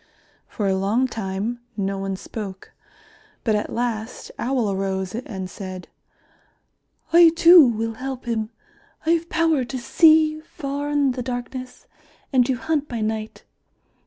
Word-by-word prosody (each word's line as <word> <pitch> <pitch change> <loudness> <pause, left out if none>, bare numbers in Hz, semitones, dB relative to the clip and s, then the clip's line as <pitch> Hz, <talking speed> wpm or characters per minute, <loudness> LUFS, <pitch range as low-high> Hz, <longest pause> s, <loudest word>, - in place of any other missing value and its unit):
For 205 - -3
a 190 - +2
long 210 +7 +1
time 220 +1 -3 0.2
no 195 -1 -1
one 195 0 -3
spoke, 195 -1 -8 0.7
but 220 - +1
at 210 - -1
last 230 -1 -3
Owl 245 -5 0
arose 190 -1 -2
and 200 -5 -5
said, 185 -1 -8 1.2
"I 340 0 +9
too 335 -3 +8
will 225 -1 -1
help 260 +2 -6
him. 220 -2 -2 0.6
I 325 - +3
have 335 0 +1
power 325 -5 +2
to 260 +2 -5
see 310 +4 +4
far 285 -2 -5
in 290 -2 +2
the 250 0 -4
darkness, 250 +1 -6 0.5
and 255 -2 +5
to 260 - +1
hunt 295 +4 -1
by 235 -5 -4
night. 215 0 -3
240 Hz, 140 wpm, -23 LUFS, 205-275 Hz, 1.2 s, I